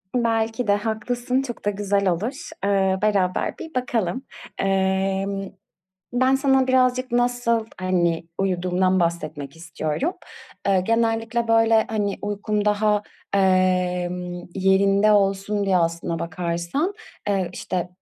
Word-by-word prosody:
Belki 225 -1 0
de 205 - +4
haklısın, 240 +4 -1
çok 240 -5 -7
da - - +3
güzel 200 -1 0
olur, 215 +11 -2 0.3
ııı, 190 -1 +2
beraber 195 -4 +1
bir 320 - -9
bakalım. 245 -2 -1 0.3
Emm, 195 0 0 0.6
ben 260 +2 +3
sana 270 -1 +3
birazcık 255 -1 +2
nasıl, 245 -2 +1
hani, 175 -3 +1
uyuduğumdan 185 0 +1
bahsetmek 155 -4 -2
istiyorum. 170 - -2 0.6
Iıı, 190 -2 +4
genellikle, 230 +1 0
böyle, 225 -1 +4
hani, 205 -2 -1
uykum 205 0 -1
daha, 210 0 +2 0.3
emm, 180 -2 +1
yerinde 195 +2 +4
olsun 200 0 +1
diye, 190 -2 +2
aslına 170 -1 0
bakarsan, 170 - -2 0.4
eee, 195 -3 +1
işte, 180 -1 -3
200 Hz, 115 wpm, -23 LUFS, 185-225 Hz, 0.6 s, de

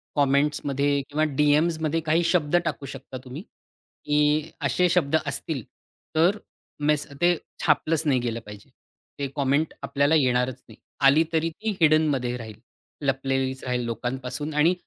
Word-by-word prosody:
कॉमेंट्समध्ये 140 0 +1
किंवा 155 +2 0
डीएमज 150 +3 +3
मध्ये 160 +2 +1
काही 160 +2 +2
शब्द 165 -2 +1
टाकू 145 -3 -3
शकता 135 -1 -8
तुम्ही 130 +5 -7 0.6
की 150 +1 +2 0.2
असे 180 +7 +2
शब्द 160 -4 +2
असतील 140 -7 -3 0.5
तर 175 +6 +4 0.4
मेस 150 0 +1
ते 175 -1 +4 0.3
छापलंच 155 0 +2
नाही 135 -4 +3
गेलं 120 -1 -3
पाहिजे. 105 +4 -12 0.5
ते 140 - -1
कॉमेंट 140 +3 +1
आपल्याला 140 +3 +2
येणारच 130 -2 +1
नाही. - - -15 0.3
आली 145 +4 +6
तरी 165 +1 +1
ती 220 +7 -5
हिडन 155 0 +5
मध्ये 125 -3 -1
राहील. 110 -2 -9 0.5
लपलेलीच 135 0 -1
राहील 125 -1 -1
लोकांपासून 125 +5 -4
आणि 150 +4 +4
145 Hz, 140 wpm, -25 LUFS, 130-155 Hz, 0.6 s, आली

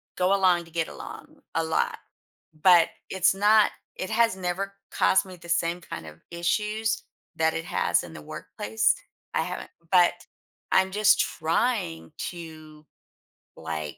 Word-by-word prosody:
go 185 +1 +2
along 180 -3 +3
to 165 - -17
get 165 -1 -1
along - - -10
a 165 - +2
lot, 160 0 0 0.7
but, 175 -3 +7 0.2
it's 190 -1 +3
not 210 +2 +5 0.2
it 185 - -4
has 230 -3 +3
never 190 +2 -3 0.2
caused 190 - +3
me 185 -1 -10
the 170 -1 -14
same 170 +1 0
kind 80 - -7
of 80 0 -12
issues 210 +6 0 0.4
that 160 0 +2
it 80 - -3
has - - +1
in 85 - -10
the 75 - -9
workplace. 105 +8 -1 0.4
I - - +2
haven't - - -5 0.2
but 180 -2 +6 0.6
I'm 190 0 +4
just 210 +1 +4
trying 165 0 0 0.2
to, 155 -3 -11 0.7
like, 80 -2 -5
175 Hz, 145 wpm, -26 LUFS, 160-195 Hz, 0.7 s, but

